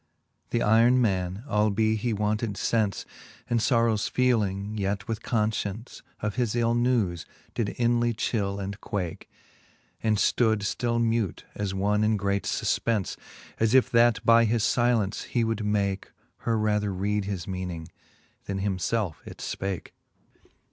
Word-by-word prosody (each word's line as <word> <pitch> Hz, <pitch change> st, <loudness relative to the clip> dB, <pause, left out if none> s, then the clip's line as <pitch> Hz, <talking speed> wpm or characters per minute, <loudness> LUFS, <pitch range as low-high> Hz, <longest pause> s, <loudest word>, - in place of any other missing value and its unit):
Theyron 115 Hz, +2 st, +4 dB
man, 95 Hz, -3 st, 0 dB
albe 110 Hz, -1 st, +2 dB
he 115 Hz, +2 st, -1 dB
wanted 105 Hz, 0 st, -1 dB, 0.2 s
lence 110 Hz, -4 st, +1 dB, 0.4 s
And 120 Hz, -, +1 dB
{brrowes 115 Hz, -2 st, +2 dB
feeling, 105 Hz, -5 st, +1 dB
yet 100 Hz, +1 st, -2 dB
with 110 Hz, -2 st, -3 dB
confcience 110 Hz, 0 st, -2 dB, 0.2 s
Of 105 Hz, -1 st, -3 dB
his 120 Hz, -3 st, 0 dB
ill 115 Hz, -1 st, +2 dB
newes^ 115 Hz, -9 st, +1 dB, 0.3 s
did 110 Hz, -4 st, -1 dB
inly 120 Hz, 0 st, +2 dB
chill 100 Hz, -3 st, -1 dB
and 100 Hz, +1 st, -5 dB
quake, 90 Hz, -5 st, -4 dB, 0.7 s
And 110 Hz, -2 st, +2 dB
ftood 110 Hz, 0 st, +2 dB
ftill 115 Hz, +3 st, 0 dB
mute, 115 Hz, -6 st, 0 dB
as 100 Hz, -2 st, -3 dB
one 105 Hz, +2 st, +1 dB
in 110 Hz, 0 st, +2 dB
great 100 Hz, 0 st, -1 dB
fufpence, 110 Hz, -5 st, 0 dB, 0.4 s
As 115 Hz, +2 st, +3 dB
if 130 Hz, -, +4 dB
that 115 Hz, -2 st, +4 dB
by 115 Hz, 0 st, +6 dB
his 115 Hz, 0 st, +1 dB
filence 120 Hz, -5 st, +1 dB
he 120 Hz, -, 0 dB
would 110 Hz, -1 st, -1 dB
make 100 Hz, -2 st, -1 dB, 0.3 s
Her 115 Hz, -1 st, -1 dB
rather 105 Hz, -1 st, +1 dB
read 100 Hz, +2 st, -1 dB
his 95 Hz, -4 st, -4 dB
meaning, 90 Hz, -4 st, -4 dB, 0.6 s
then 100 Hz, -, -3 dB
him 95 Hz, -1 st, -1 dB
felfe 100 Hz, -5 st, -1 dB
it -, -, -9 dB
fpake. 95 Hz, -2 st, -4 dB
105 Hz, 140 wpm, -27 LUFS, 100-115 Hz, 0.7 s, by